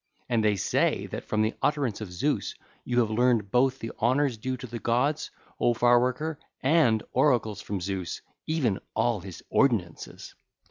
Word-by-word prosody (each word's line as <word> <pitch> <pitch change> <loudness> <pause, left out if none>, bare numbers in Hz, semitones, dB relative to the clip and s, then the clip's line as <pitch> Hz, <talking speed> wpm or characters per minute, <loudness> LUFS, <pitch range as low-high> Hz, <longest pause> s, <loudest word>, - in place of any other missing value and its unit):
And 115 -2 +1
they 105 -1 +3
say 95 - +1
that - - -5
from 110 0 +1
the 110 - 0
utterance 140 -8 0
of 100 -4 -6
Zeus 135 +12 -1 0.3
you 125 0 +2
have 110 -2 -1
learned 115 -3 +2
both 130 +1 +3
the 115 - -6
honours 130 +2 +2
due 130 +4 -3
to 125 - -8
the 120 -1 -6
gods, 125 +7 0 0.3
O 120 - +3
Far 120 +1 +5
worker, 140 +5 -1 0.2
and 130 -7 +3
oracles 125 -6 +2
from 100 -1 -4
Zeus, 95 -1 -4 0.2
even 135 -11 0 0.2
all 120 -3 +1
his 90 -2 -10
ordinances. 105 -12 0
120 Hz, 170 wpm, -27 LUFS, 110-130 Hz, 0.3 s, Far